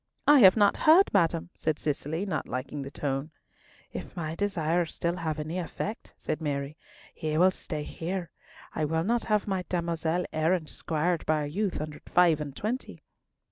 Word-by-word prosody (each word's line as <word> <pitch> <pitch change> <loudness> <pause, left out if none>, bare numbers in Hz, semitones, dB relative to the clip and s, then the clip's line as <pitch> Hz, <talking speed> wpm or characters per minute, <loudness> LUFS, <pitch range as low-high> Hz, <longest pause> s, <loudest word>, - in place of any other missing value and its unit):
"I 295 -1 +8
have 190 -2 +8
not 205 -2 +4
heard, 335 +5 +6
madam," 170 -2 +2
said 155 -1 -1
Cicely, 155 +4 -2
not 175 -6 -2
liking 135 +3 -4
the 135 - -6
tone. 140 +1 -3 0.6
"If - - -7
my 160 -3 -3
desires 170 -3 0
still 170 +1 -1
have 160 -3 -2
any 155 +4 -3
effect," 205 +5 -5
said 155 +1 -3
Mary, 140 -1 -2 0.4
"he 155 -1 -2
will 185 +3 +6
stay 155 -4 -5
here. 175 +2 -4 0.4
I - - -1
will 160 +2 0
not 235 +5 0
have 210 -1 +1
my 190 -2 -1
damosel 170 0 0
errant 160 +1 +1
squired 165 +1 -1
by 155 -1 +2
a - - -2
youth 190 +6 -2
under 150 0 -5
five 170 -4 +4
and 145 -2 -6
twenty." 235 +5 -4
165 Hz, 175 wpm, -28 LUFS, 155-185 Hz, 0.6 s, I